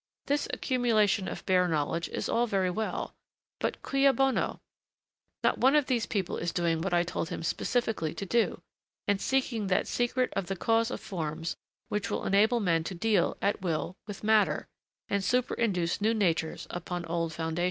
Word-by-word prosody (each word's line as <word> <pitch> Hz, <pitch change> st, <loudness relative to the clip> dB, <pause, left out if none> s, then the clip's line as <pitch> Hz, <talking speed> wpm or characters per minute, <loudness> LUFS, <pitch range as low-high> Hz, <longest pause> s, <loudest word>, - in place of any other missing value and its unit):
This 285 Hz, +1 st, 0 dB
accumulation 220 Hz, -6 st, +2 dB
of -, -, -6 dB
bare 180 Hz, -1 st, +3 dB
knowledge 165 Hz, +1 st, -1 dB
is -, -, -3 dB
all 240 Hz, +1 st, +2 dB
very 190 Hz, -4 st, +1 dB
well, 220 Hz, +4 st, -3 dB, 0.5 s
but -, -, -2 dB
cui 275 Hz, 0 st, +4 dB
bono? 270 Hz, 0 st, +1 dB, 0.8 s
Not -, -, +2 dB
one 265 Hz, +3 st, +5 dB
of 295 Hz, -2 st, +4 dB
these 245 Hz, -4 st, 0 dB
people 195 Hz, -5 st, -1 dB
is 170 Hz, 0 st, -2 dB
doing 170 Hz, -3 st, 0 dB
what 195 Hz, +2 st, -1 dB
I 175 Hz, 0 st, +3 dB
told 170 Hz, -1 st, -3 dB
him -, -, -5 dB
specially 220 Hz, -3 st, -1 dB
to 200 Hz, -, -4 dB
do, 235 Hz, +4 st, +1 dB, 0.4 s
and 200 Hz, -1 st, +2 dB
seeking 250 Hz, -6 st, 0 dB
that 185 Hz, -, +2 dB
secret 245 Hz, +1 st, 0 dB
of 180 Hz, -, -1 dB
the 195 Hz, -, -2 dB
cause 225 Hz, +4 st, +2 dB
of -, -, -4 dB
forms 165 Hz, -3 st, -3 dB, 0.3 s
which 210 Hz, +2 st, -1 dB
will -, -, -2 dB
enable 215 Hz, +5 st, +4 dB
men 165 Hz, -6 st, +2 dB
to 185 Hz, -, -4 dB
deal, 200 Hz, 0 st, +2 dB
at 200 Hz, 0 st, +1 dB
will, 175 Hz, 0 st, -2 dB
with 205 Hz, -1 st, -7 dB
matter, 215 Hz, -1 st, +3 dB, 0.4 s
and 200 Hz, 0 st, 0 dB
superinduce 205 Hz, -6 st, 0 dB
new 220 Hz, +2 st, +3 dB
natures 165 Hz, -6 st, 0 dB
upon 175 Hz, 0 st, -4 dB
the -, -, -9 dB
old 165 Hz, -1 st, -1 dB
foundations.' 160 Hz, +1 st, -3 dB
195 Hz, 180 wpm, -29 LUFS, 170-230 Hz, 0.8 s, one